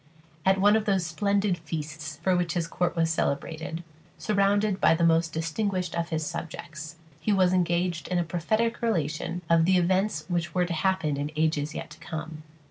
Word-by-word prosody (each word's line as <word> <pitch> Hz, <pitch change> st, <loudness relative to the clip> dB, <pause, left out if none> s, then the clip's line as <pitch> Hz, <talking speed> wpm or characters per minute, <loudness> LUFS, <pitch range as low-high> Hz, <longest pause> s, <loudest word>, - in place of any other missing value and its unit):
At 190 Hz, 0 st, +5 dB
one 205 Hz, +2 st, +5 dB
of 220 Hz, -1 st, +1 dB
those 195 Hz, -4 st, +1 dB
splendid 200 Hz, +1 st, +1 dB
feasts 155 Hz, -1 st, -5 dB
for 185 Hz, 0 st, +3 dB
which 175 Hz, -1 st, 0 dB
his 170 Hz, -2 st, 0 dB
court 175 Hz, +2 st, -1 dB
was 165 Hz, -1 st, +2 dB
celebrated, 160 Hz, +2 st, -2 dB, 0.3 s
surrounded 205 Hz, -1 st, +1 dB
by 165 Hz, -, +5 dB
the 170 Hz, -, 0 dB
most 165 Hz, 0 st, +3 dB
distinguished 180 Hz, +2 st, -2 dB
of 170 Hz, 0 st, -2 dB
his 160 Hz, -1 st, -1 dB
subjects, 155 Hz, 0 st, -6 dB, 0.2 s
he 210 Hz, -, 0 dB
was 185 Hz, -2 st, +4 dB
engaged 175 Hz, -1 st, +1 dB
in 180 Hz, -, 0 dB
a 175 Hz, -, +2 dB
prophetic 215 Hz, +8 st, 0 dB
relation 170 Hz, -5 st, -1 dB
of 165 Hz, 0 st, +4 dB
the 185 Hz, +1 st, +4 dB
events 185 Hz, -2 st, +1 dB
which 170 Hz, -1 st, -2 dB
were 180 Hz, -1 st, +3 dB
to 175 Hz, -, -3 dB
happen 165 Hz, -4 st, 0 dB
in 145 Hz, +1 st, -2 dB
ages 155 Hz, -1 st, 0 dB
yet -, -, -6 dB
to 150 Hz, -, -12 dB
come. 155 Hz, -1 st, -6 dB
170 Hz, 185 wpm, -27 LUFS, 160-190 Hz, 0.3 s, At